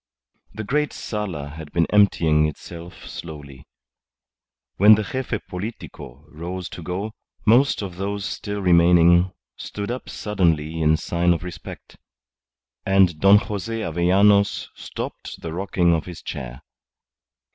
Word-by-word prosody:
The 110 - -4
great 150 +6 0
sala 95 -10 -4
had 80 0 -10
been 85 -1 +3
emptying 80 -7 +4
itself 85 +3 -9
slowly. 70 -4 -9 1.1
When 105 +2 +8
the 110 - -2
Gefe 125 0 -4
Politico 90 - -8
rose 85 +4 -6
to - - -9
go, 95 +6 -4 0.3
most 120 +1 +4
of 90 -3 -7
those 100 +1 -3
still 100 -1 -4
remaining 85 0 +5 0.3
stood 100 +2 -5
up 125 - -6
suddenly 80 -6 0
in 80 0 +4
sign 85 +1 +1
of 85 - -4
respect, 85 -2 -9 0.9
and 95 -5 +3
Don 100 +3 +7
Jose 105 +2 -3
Avellanos 100 +4 +3
stopped - - -7
the 80 -1 -5
rocking 90 -1 +1
of 80 - -1
his 90 -2 -9
chair. 65 0 -7
90 Hz, 125 wpm, -22 LUFS, 80-100 Hz, 1.1 s, When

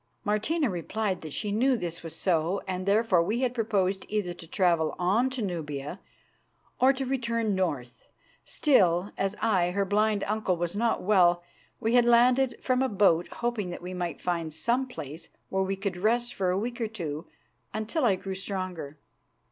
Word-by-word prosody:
Martina 220 +10 +1
replied 190 +1 -2
that 155 - -7
she 205 +7 -2
knew 250 +5 +3
this 170 -4 -4
was 165 -1 -6
so, 175 +1 +1
and 185 0 -3
therefore 205 -3 +4
we 215 +8 -1
had 250 -2 +1
proposed 200 -5 0
either 205 -4 -1
to 165 - -12
travel 170 -3 +1
on 205 +9 +2
to 260 -3 -3
Nubia 155 -3 -4 0.8
or 260 +1 +6
to 270 0 -3
return 230 -4 0
north. 145 -10 -3 0.4
Still, 190 - +3
as 195 +1 -1
I, 190 -6 +2
her 200 +2 0
blind 210 +1 +1
uncle, 210 -4 0
was 175 +2 -2
not 230 +2 +1
well, 175 -3 +4 0.4
we 225 +1 0
had 245 -1 +5
landed 245 +1 +4
from 255 -1 +2
a 265 - +2
boat 190 -5 +3
hoping 235 -6 -3
that 175 - -7
we 180 +1 -5
might 175 -1 -3
find 170 -3 -2
some 240 +9 0
place 155 - -8 0.2
where 190 - 0
we 190 +1 0
could 195 -2 -3
rest 240 +5 +1
for 185 -2 0
a 180 - +1
week 235 +4 -3
or 225 - +1
two 165 -7 -5 0.4
until 220 +8 -2
I 215 -6 +4
grew 190 +1 -5
stronger. 185 -6 -5
195 Hz, 180 wpm, -28 LUFS, 175-230 Hz, 0.8 s, or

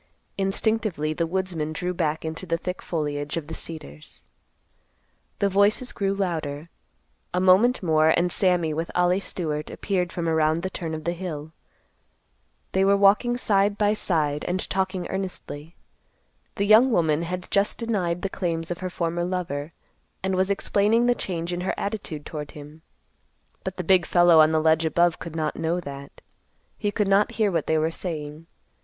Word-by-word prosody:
Instinctively 195 -5 0
the 165 +1 -1
woodsman 170 -4 -2
drew 180 +3 -2
back 160 -2 -1
into 160 +4 -5
the 165 0 +1
thick 180 +2 -5
foliage 145 -2 -3
of 165 - -3
the 160 - -8
cedars. 75 - -8 1.1
The 200 - +2
voices 200 +5 +2
grew 195 0 -1
louder. 160 -5 -3 0.7
A - - +2
moment 190 +6 +4
more 155 -2 +4
and 175 +2 +2
Sammy 175 -5 +2
with 165 +2 -3
Ollie 180 +1 +3
Stewart 155 -6 -3
appeared 180 -4 -2
from 170 -1 -3
around 160 +1 +2
the 190 - -3
turn 165 -3 -4
of 155 - -7
the 170 +2 -1
hill. 160 -4 -6 1.2
They 190 - +2
were 200 +1 +4
walking 210 +5 +4
side 205 -3 +2
by 210 -1 +3
side 150 -8 0
and 185 +1 -1
talking 190 -1 -1
earnestly. 175 -4 -6 0.8
The 200 - 0
young 220 +5 +7
woman 160 -6 +2
had 180 +1 -5
just 200 +1 +2
denied 185 -7 -1
the - - +1
claims 165 -3 -3
of 175 - -4
her 185 - -3
former 170 -1 -2
lover, 170 -5 -3 0.5
and 190 0 0
was 185 +1 +1
explaining 210 +3 +2
the 245 - +4
change 175 -6 -4
in 175 - -3
her 185 - -1
attitude 200 -8 -4
toward 150 -3 -6
him; 150 +2 -11 0.8
but 190 -1 -5
the 180 - -3
big 180 0 +3
fellow 175 -2 +6
on 155 0 +7
the 160 - +3
ledge 160 +1 +3
above 170 +1 +2
could 165 -1 -7
not 155 -2 -2
know 165 +2 0
that. 140 -3 -9 0.5
He 205 - -1
could 205 0 0
not 195 +1 +3
hear 215 -3 +1
what 165 -4 -1
they 160 - +2
were 160 +1 +1
saying. 155 -2 -6
175 Hz, 175 wpm, -25 LUFS, 160-195 Hz, 1.2 s, young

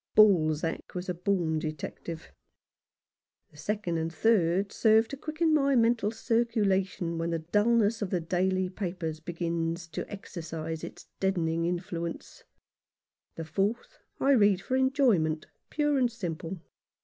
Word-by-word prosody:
Balzac 165 -7 +3
was 180 +1 -4
a - - +1
born 175 -3 0
detective. 155 +1 -6 1.2
The 150 - -18
second 175 0 -2
and 165 +1 -2
third 195 0 +2
serve 220 0 +4
to - - -5
quicken 310 +3 0
my 280 -2 +3
mental 230 -3 +3
circulation 205 -7 0
when 165 0 -1
the 165 - 0
dulness 210 +6 +2
of 205 - -1
the 180 - 0
daily 185 +3 0
papers 175 -4 -4
begins 170 +1 -2
to 155 - -5
exercise 160 -5 -6
its - - -8
deaden 190 -4 +1
ing 165 +1 0
influence; 170 -1 -4 0.9
the 165 - -5
fourth 205 - -2 0.2
I 275 - +3
read 205 -7 +5
for 255 +6 -2
enjoyment 245 - +2 0.2
pure 295 -2 +1
and 245 -2 +2
simple. 180 -4 -5
185 Hz, 135 wpm, -29 LUFS, 165-225 Hz, 1.2 s, read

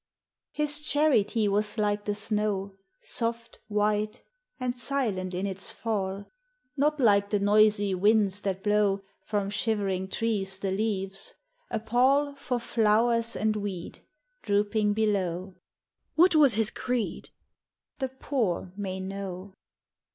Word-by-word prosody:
His 300 0 0
charity 255 -8 +2
was 205 +2 0
like 205 -1 0
the 205 - -1
snow, 210 -2 -1 0.3
Soft, 235 - -3
white, 210 0 0 0.4
and 250 -1 -2
silent 225 -9 -2
in 185 +2 -2
its 195 -1 -2
fall; 200 -3 -3 0.5
Not 300 +1 +1
like 200 -5 +4
the 205 - +2
noisy 205 0 +4
winds 205 +1 +3
that 190 -2 -3
blow 205 -2 +2 0.2
From 205 -2 -2
shivering 200 -3 -1
trees 195 -2 -1
the 195 0 -2
leaves, 195 -1 -2 0.2
— - - -45
a - - -1
pall 260 +6 +2
For 255 -3 -3
flowers 230 +1 +2
and 215 0 +1
weed, 200 -4 -5 0.4
Drooping 205 0 +1
below. 190 -4 -1 0.6
"What 350 +2 +6
was 290 -7 +5
his 220 -1 +1
creed?" 245 -3 -3 0.7
The 265 -2 -1
poor 230 -9 -2
may 190 -2 -4
know. 190 0 -6
210 Hz, 125 wpm, -28 LUFS, 195-230 Hz, 0.7 s, What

